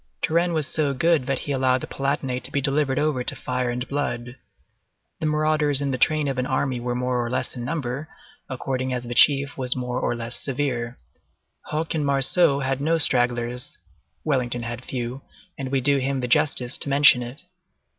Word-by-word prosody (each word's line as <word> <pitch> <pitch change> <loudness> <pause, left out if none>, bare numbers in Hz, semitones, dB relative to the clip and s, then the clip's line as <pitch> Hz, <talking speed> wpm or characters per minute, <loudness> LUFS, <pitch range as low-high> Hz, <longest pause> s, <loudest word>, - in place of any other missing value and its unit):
Turenne 170 +2 +2
was 155 -2 0
so 145 -2 0
good 160 -2 +2
that 135 - 0
he 145 - -5
allowed 130 -1 +2
the - - -4
Palatinate 135 -2 -2
to 135 - -1
be 140 - 0
delivered 140 -1 0
over 150 -5 0
to - - -3
fire 125 -1 -2
and 125 +2 -3
blood. 130 -4 -3 0.8
The 160 - -1
marauders 150 -2 +2
in 140 -1 -1
the 130 - -3
train 155 +1 +2
of 135 -2 -2
an 125 - -1
army 130 -2 -1
were 120 0 -3
more 125 0 -1
or 120 - -3
less 130 +2 -2
in 120 - -5
number, 140 +1 -4 0.4
according 130 0 -3
as 125 -1 -3
the 120 0 -5
chief 140 +2 +5
was 125 -1 -1
more 125 -1 -3
or - - 0
less 115 0 -3
severe. 125 -4 -2 0.7
Hoche 160 +2 -2
and 155 -2 -1
Marceau 140 +2 +3
had 135 0 -1
no 165 +3 +2
stragglers; 120 -3 +1 0.5
Wellington 125 -5 -1
had 120 +1 -6
few, 125 +1 -5 0.3
and 135 -1 -5
we 135 -1 +1
do 140 +2 +3
him 135 0 -1
the 125 - -2
justice 135 -3 +2
to - - +5
mention 140 -2 +6
it. 120 +3 -8
130 Hz, 195 wpm, -23 LUFS, 125-145 Hz, 0.8 s, mention